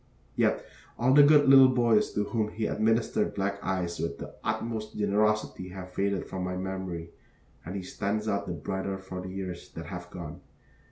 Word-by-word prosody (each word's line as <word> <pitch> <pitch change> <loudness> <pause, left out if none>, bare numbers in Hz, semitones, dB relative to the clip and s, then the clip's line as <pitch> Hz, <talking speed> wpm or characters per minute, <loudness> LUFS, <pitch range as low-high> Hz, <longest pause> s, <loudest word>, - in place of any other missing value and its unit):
Yet - - +1 0.3
all 125 +2 +3
the 145 - +9
good 145 0 +6
little 135 -1 +9
boys 120 -4 +3
to 105 - +1
whom 110 0 -1
he 110 0 -3
administered 110 -1 +1
black 100 0 -2
eyes 90 -2 -2
with 85 - -2
the - - -8
utmost 110 0 -3
generosity 105 -2 +1
have 90 0 -9
faded 100 0 0
from 95 -1 -5
my 90 0 -3
memory 95 -3 -4 0.5
and 90 +4 -6
he 95 - -4
stands 105 +3 -2
out 100 -1 -1
the 90 - -2
brighter 95 +4 -3
for 95 -1 -7
the 95 - -7
years 95 -2 -6
that 80 - -7
have 90 -2 -7
gone. 85 -5 -8
100 Hz, 180 wpm, -28 LUFS, 90-110 Hz, 0.5 s, the